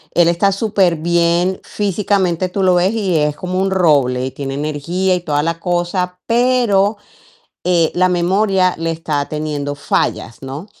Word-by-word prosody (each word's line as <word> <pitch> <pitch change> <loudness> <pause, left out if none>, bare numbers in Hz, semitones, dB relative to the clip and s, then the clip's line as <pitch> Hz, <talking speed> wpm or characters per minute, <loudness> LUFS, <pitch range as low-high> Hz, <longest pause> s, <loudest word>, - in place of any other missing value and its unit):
él 175 -1 +5
está 175 +4 +2
superbién, 175 -3 +1
físicamente 190 -3 -1
tú 195 +2 -2
lo 185 -1 +4
ves 180 +2 +2
y 200 -6 -1
es 150 -1 +1
como 185 +3 -3
un 195 0 +1
roble, 140 -9 +2
y 130 - -4
tiene 135 0 -5
energía 155 +6 -1
y - - -1
toda 150 -4 0
la 165 +1 -2
cosa 180 +1 -2
pero, 230 -4 +2 0.7
eh, 175 -3 +2
la 185 +1 +2
memoria 185 +1 +2
le 165 0 -1
está 160 -3 -2
teniendo 150 -2 -3
fallas, 115 -4 -2
¿no? 135 +6 -7
175 Hz, 155 wpm, -17 LUFS, 155-190 Hz, 0.7 s, él